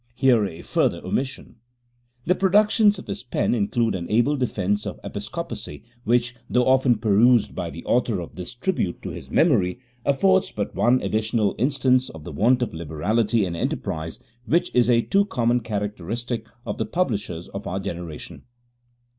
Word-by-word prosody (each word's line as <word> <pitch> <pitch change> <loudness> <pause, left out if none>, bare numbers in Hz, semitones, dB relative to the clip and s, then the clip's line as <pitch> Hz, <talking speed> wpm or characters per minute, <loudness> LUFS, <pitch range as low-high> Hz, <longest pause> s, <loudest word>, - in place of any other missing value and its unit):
[Here 125 -4 +4
a 85 -2 -9
further - - 0
omission.] 130 -3 -3 0.7
The 180 - +4
productions 205 +2 +4
of - - -9
his - - -5
pen 125 - 0
include 115 +1 +1
an 85 -2 -4
able 120 +7 +3
defence 105 -6 -1
of - - -6
Episcopacy, 75 - -6 0.2
which, 120 +1 +1
though 125 0 +2
often 130 -2 +4
perused 110 +2 +4
by - - -4
the 80 +4 -9
author 120 -5 +1
of 85 - -7
this 90 +6 -7
tribute 120 - -2
to - - -4
his 65 - -9
memory, 115 - +3 0.3
afford 190 +7 +3
but 100 - -3
one 125 +2 +2
additional 110 -1 0
instance 130 0 +2
of 80 -2 -10
the - - -7
want 125 +4 +3
of 120 - -4
liberality 100 +8 0
and 85 -2 -4
enterprise 80 -1 -3 0.3
which 170 +7 +1
is 125 0 +3
a 120 -1 +4
too 200 0 +3
common 120 - +1
characteristic 110 +2 -4 0.2
of - - -4
the - - 0
publishers 105 - -2
of 100 +1 -7
our 95 +2 -2
generation. 85 -4 -6
115 Hz, 165 wpm, -24 LUFS, 100-130 Hz, 0.7 s, Here